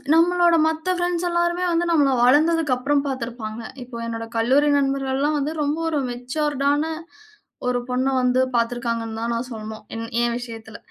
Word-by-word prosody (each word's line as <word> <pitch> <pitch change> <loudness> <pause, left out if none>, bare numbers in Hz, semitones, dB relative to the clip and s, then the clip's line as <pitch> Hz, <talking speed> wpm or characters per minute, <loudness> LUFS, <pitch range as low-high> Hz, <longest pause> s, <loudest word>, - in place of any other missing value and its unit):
நம்பளோட 345 0 +4
மத்த 320 +3 -1
ஃப்ரெண்ட்ஸ் 350 0 -1
எல்லாருமே 345 +1 0
வந்து 340 +1 +1
நம்மள 285 -4 +4
வளந்ததுக்கப்புறம் 290 -1 +3
பாத்துருப்பாங்க. 235 -3 -5 0.2
இப்போ 245 -1 -9
என்னோட 230 0 -4
கல்லூரி 270 +6 +3
நண்பர்கள்லாம் 275 +2 0
வந்து 300 +3 -2
ரொம்ப 295 +3 -1
ஒரு 295 -3 0
மெச்சூர்ட் 275 +3 -2
ஆன, 290 +1 +1 0.9
ஒரு 245 0 +1
பொண்ண 255 +2 0
வந்து 250 0 +2 0.2
பாத்துருக்காங்கன்னு 230 -1 -2
தான் 235 0 -1
நான் 250 +2 -4
சொல்லணும். 220 -1 -7
என் 230 0 -4 0.2
எ - - +3
விஷயத்துல. 225 -3 -9
270 Hz, 150 wpm, -22 LUFS, 235-310 Hz, 0.9 s, நம்பளோட